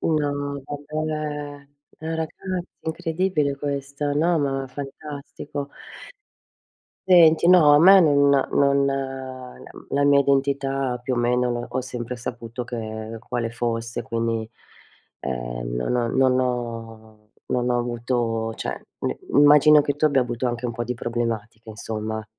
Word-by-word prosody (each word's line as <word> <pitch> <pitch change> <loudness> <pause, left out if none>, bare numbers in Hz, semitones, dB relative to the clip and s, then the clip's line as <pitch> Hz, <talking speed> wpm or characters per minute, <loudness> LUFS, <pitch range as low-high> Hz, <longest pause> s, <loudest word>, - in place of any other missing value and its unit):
No, 145 -2 -1
vabbè! 145 -1 -5 0.3
Ragazzi, 160 0 -4 0.5
è - - -5
incredibile 165 -3 0
questo, 140 0 -3
no, 165 +3 +2
ma 135 -2 -1
fantastico. 140 +1 -7 1.4
Senti 170 -2 +6
no, 155 -5 +7
a - - +7
me 190 +3 +9
non 145 -4 +4 0.2
non 140 0 +3
la 130 -2 -5
m - - -14
la 140 +1 +1
mia 140 0 +5
identità 135 -2 0
più 130 0 -1
o - - -5
meno 120 0 0
ho 130 - -2
sempre 125 -1 -5
saputo 120 0 -6
che 110 -2 -6
quale 120 -2 -2
fosse, 115 0 -3
quindi, 115 -1 -2 0.7
ehm, - - -4
non 125 - +1
ho 120 -1 +1
non 130 -1 +3
ho 115 -3 -5 0.2
non 125 0 0
ho 120 - +2
avuto 120 -2 -2
cioè - - -5 0.2
n - - -2 0.2
immagino 150 +1 +7
che 145 -1 -1
tu 155 - -1
abbia 140 -3 +4
avuto 120 0 -2
anche 120 0 -3
un - - -2
po' 120 +1 -3
di 125 +1 -3
problematiche 115 -1 -4
insomma. 110 +1 -5
130 Hz, 135 wpm, -23 LUFS, 115-145 Hz, 1.4 s, me